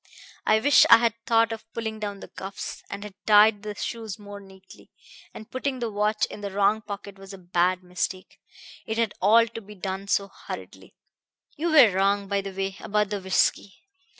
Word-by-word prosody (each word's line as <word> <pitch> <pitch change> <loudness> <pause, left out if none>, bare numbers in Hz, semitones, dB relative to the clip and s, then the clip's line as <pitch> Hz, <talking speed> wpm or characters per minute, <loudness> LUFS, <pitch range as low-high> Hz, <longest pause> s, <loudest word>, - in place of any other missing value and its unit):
I 215 - +5
wish 285 +5 +6
I 230 - +10
had 230 -1 +1
thought 230 0 +3
of 225 0 -8
pulling 220 -1 -4
down 205 -2 -5
the - - -9
cuffs, 195 +1 -7
and 200 0 -6
had 210 -2 -9
tied 210 0 +6
the 210 0 -6
shoes 220 -2 -5
more 205 -1 -10
neatly. 190 -1 -17 0.4
And 215 - -11
putting 260 +1 -2
the 235 -3 -3
watch 210 +1 +1
in - - -10
the 200 - -4
wrong 200 +2 +2
pocket 200 -2 -8
was 195 0 -11
a - - -8
bad 180 0 0
mistake. 180 +1 -4 0.5
It 220 - -3
had 230 -3 0
all 225 +4 +6
to 230 0 -9
be 210 0 -13
done 190 +1 -5
so 200 0 +1 0.2
hurriedly. - - -9 0.6
"You 335 +3 -1
were 280 -9 +7
wrong, 200 +1 +1
by 200 0 0
the 195 - -6
way, 195 0 -4
about 210 0 -1
the 205 -1 -3
whisky. 190 +1 +1
205 Hz, 195 wpm, -25 LUFS, 195-220 Hz, 0.6 s, I